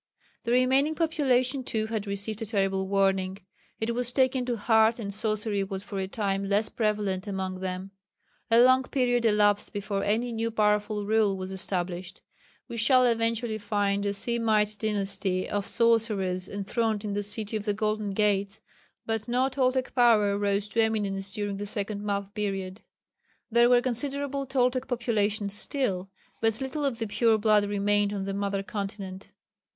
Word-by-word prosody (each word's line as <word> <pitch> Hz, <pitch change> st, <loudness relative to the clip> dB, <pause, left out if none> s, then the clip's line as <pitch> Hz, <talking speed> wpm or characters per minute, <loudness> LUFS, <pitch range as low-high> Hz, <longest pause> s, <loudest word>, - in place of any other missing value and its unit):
The 235 Hz, -, -1 dB
remaining 265 Hz, +5 st, +3 dB
population 275 Hz, -5 st, +1 dB
too 220 Hz, -3 st, -2 dB
had 220 Hz, -2 st, -4 dB
received 200 Hz, +2 st, -2 dB
a -, -, -2 dB
terrible 195 Hz, -2 st, 0 dB
warning. 195 Hz, -1 st, +1 dB, 0.4 s
It 225 Hz, +1 st, -1 dB
was 245 Hz, 0 st, -2 dB
taken 260 Hz, -1 st, +2 dB
to 240 Hz, -2 st, -1 dB
heart, 220 Hz, +1 st, +3 dB
and 200 Hz, -4 st, -5 dB
sorcery 215 Hz, -1 st, 0 dB
was 195 Hz, 0 st, -5 dB
for 200 Hz, -1 st, -5 dB
a 190 Hz, -, -2 dB
time 195 Hz, -1 st, -2 dB
less 205 Hz, +2 st, +1 dB
prevalent 210 Hz, -3 st, -1 dB
among 190 Hz, -2 st, -3 dB
them. 185 Hz, +1 st, -5 dB, 0.6 s
A 230 Hz, 0 st, +5 dB
long 255 Hz, +1 st, +6 dB
period 245 Hz, -2 st, 0 dB
elapsed 210 Hz, -1 st, +2 dB
before 205 Hz, -1 st, -3 dB
any 230 Hz, +4 st, 0 dB
new 230 Hz, 0 st, -1 dB
powerful 210 Hz, -1 st, +1 dB
rule 210 Hz, -2 st, +2 dB
was 185 Hz, 0 st, -5 dB
established. 185 Hz, -1 st, -3 dB, 0.4 s
We 235 Hz, -, -6 dB
shall 255 Hz, +2 st, +5 dB
eventually 230 Hz, -1 st, 0 dB
find 200 Hz, -1 st, 0 dB
a 200 Hz, -, 0 dB
Semite 215 Hz, -1 st, +1 dB
dynasty 195 Hz, -3 st, -1 dB
of 205 Hz, -1 st, -2 dB
sorcerers 210 Hz, -6 st, +1 dB
enthroned 210 Hz, +2 st, -2 dB
in 205 Hz, -, -2 dB
the 205 Hz, -, -1 dB
"City 210 Hz, +1 st, -2 dB
of 210 Hz, -1 st, -3 dB
the 205 Hz, -, +1 dB
Golden 215 Hz, -1 st, -1 dB
Gates," 200 Hz, -1 st, +1 dB, 0.5 s
but 225 Hz, 0 st, -2 dB
no 250 Hz, +2 st, +1 dB
Toltec 260 Hz, -1 st, 0 dB
power 220 Hz, -5 st, +4 dB
rose 200 Hz, 0 st, 0 dB
to 225 Hz, -, +2 dB
eminence 200 Hz, -3 st, -1 dB
during 205 Hz, -1 st, -3 dB
the 205 Hz, +1 st, -5 dB
second 205 Hz, 0 st, -4 dB
map 200 Hz, -1 st, -3 dB
period. 195 Hz, -1 st, -3 dB, 0.7 s
There 235 Hz, +1 st, +5 dB
were 245 Hz, -1 st, +5 dB
considerable 275 Hz, +2 st, -2 dB
Toltec 255 Hz, -1 st, +1 dB
populations 220 Hz, -4 st, 0 dB
still, 200 Hz, -5 st, -1 dB, 0.3 s
but 225 Hz, 0 st, +1 dB
little 280 Hz, +2 st, -3 dB
of 265 Hz, -4 st, -1 dB
the 225 Hz, -, -2 dB
pure 220 Hz, +2 st, +2 dB
blood 210 Hz, -1 st, +3 dB
remained 205 Hz, 0 st, +1 dB
on 200 Hz, -2 st, -3 dB
the 195 Hz, -, -3 dB
mother 200 Hz, 0 st, -2 dB
continent. 195 Hz, -1 st, -6 dB
210 Hz, 165 wpm, -27 LUFS, 200-235 Hz, 0.7 s, long